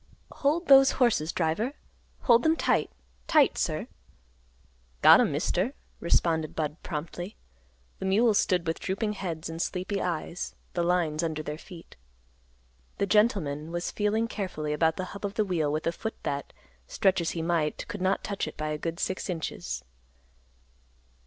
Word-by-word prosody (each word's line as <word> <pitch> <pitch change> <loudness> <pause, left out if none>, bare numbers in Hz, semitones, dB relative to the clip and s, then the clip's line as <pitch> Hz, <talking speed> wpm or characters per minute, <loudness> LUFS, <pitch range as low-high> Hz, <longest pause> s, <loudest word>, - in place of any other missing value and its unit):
"Hold 315 +5 0
those 270 -1 +8
horses, 225 -11 +2
driver. 185 - 0 0.5
Hold 235 -2 +5
them 320 +3 +3
tight; 250 - +1 0.4
tight, - - +5
sir." - - -1 1.2
"Got - - +9
'em, - - +2
Mister," 220 +10 0 0.2
responded 160 -2 +1
Budd 155 0 -3
promptly. 175 +5 -5 0.6
The 190 - -2
mules 210 +2 +4
stood 180 -3 +1
with 165 0 -2
drooping 210 +3 -1
heads 170 -5 -4
and 165 +1 -4
sleepy 190 +3 -2
eyes, 170 0 -3 0.2
the 175 - 0
lines 170 -3 +1
under 160 -2 -2
their 150 +1 -5
feet. 170 - -13 1.0
The 200 - +1
gentleman 180 -8 +1
was 175 0 -2
feeling 215 +2 0
carefully 180 -9 -3
about 160 +1 +2
the 185 - -3
hub 200 - -9
of 200 +1 -3
the 215 - +2
wheel 165 -6 0
with 155 +1 -2
a 165 - +2
foot 220 +6 -5
that, 140 0 -3 0.4
stretch 190 -2 +2
as 165 - -1
he 165 - -1
might, 165 -3 0
could - - -6
not 190 +1 +1
touch 200 -1 -2
it - - -8
by 155 0 -2
a 150 0 -3
good 165 +2 -4
six 190 -1 -2
inches. 85 - -4
175 Hz, 160 wpm, -28 LUFS, 160-205 Hz, 1.2 s, Got